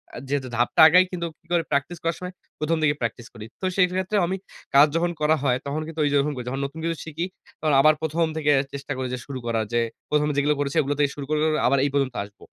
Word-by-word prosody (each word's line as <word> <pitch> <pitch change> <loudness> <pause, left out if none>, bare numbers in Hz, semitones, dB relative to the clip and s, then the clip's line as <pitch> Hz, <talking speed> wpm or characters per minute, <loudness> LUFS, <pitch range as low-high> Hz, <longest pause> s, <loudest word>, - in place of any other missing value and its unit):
আ - - -6
যেহেতু 135 -1 -1
ধাপটা 120 - +3
আগাই 180 +3 +6
কিন্তু 170 -2 -3
কি - - -38
করে 170 -1 +2
প্র্যাকটিস 140 +5 0
করার 165 0 0
সময় 180 0 -6 0.3
১ম 160 +2 0
দিকে 145 -1 +3
প্র্যাকটিস 115 0 -3
করি। 110 -3 -9 0.2
তো - - -2
সেক্ষেত্রেও 185 +2 +2
আমি 190 +2 -2 0.4
কাজ 145 +2 +8
যখন 175 +1 +1
করা 155 +1 +4
হয় 125 -3 +2
তখন 145 +2 -2
কিন্তু 165 -1 -7
ওই 145 - +2
যেরকম 145 +1 +2
করি। 125 - -6
যখন 135 +2 -3
নতুন 140 +4 -7
কিছু 165 0 -1
শিখি 160 +2 -3 0.3
তখন 155 -2 +1
আবার 155 +2 +6
১ম 160 +1 +1
থেকে 150 -1 +2 0.2
চেষ্টা 140 +1 -6
করি 130 - -2
যে 125 - -3
শুরু 135 -2 -6
করার 115 -1 0
যে 120 - +3 0.3
১ম 150 0 +2
এ - - -3
যেগুলো 145 +1 +3
করেছি 140 -1 -2
এগুলো 145 +1 -1
থেকে 145 -1 +3
শুরু 140 - -6
করে 155 0 +1 0.3
আবার 140 +2 +3
এই - - +1
পর্যন্ত 135 -3 0
আসব। 100 0 -15
150 Hz, 250 wpm, -24 LUFS, 140-165 Hz, 0.4 s, কাজ